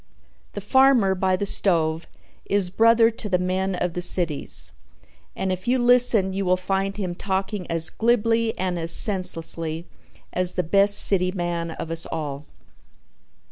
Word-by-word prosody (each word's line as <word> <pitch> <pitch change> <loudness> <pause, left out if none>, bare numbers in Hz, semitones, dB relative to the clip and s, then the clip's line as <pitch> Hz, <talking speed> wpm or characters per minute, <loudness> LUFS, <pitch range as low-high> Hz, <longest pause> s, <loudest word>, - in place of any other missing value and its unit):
The 205 - -6
farmer 245 -2 +3
by 185 0 0
the 200 - -3
stove 165 -5 +1 0.4
is 195 -3 0
brother 230 +2 +4
to 220 -1 -7
the 185 - +2
men 185 +1 -2
of 180 -1 -3
the 180 - -4
cities, 170 -4 0 0.6
and 190 - -2
if 185 +2 -5
you 250 +2 +2
listen 240 -6 +3
you 195 +1 -2
will 185 0 +1
find 195 +1 -2
him 185 -4 -4
talking 190 +1 -4
as 165 -1 +3
glibly 230 0 0
and 180 -2 -2
as 165 0 0
senselessly 165 -4 0 0.5
as 180 0 -1
the 180 - -1
best 200 +4 +3
city 185 -2 +2
man 175 -2 -3
of 165 0 -7
us 165 0 -1
all. 145 -2 -6
185 Hz, 155 wpm, -23 LUFS, 175-205 Hz, 0.6 s, brother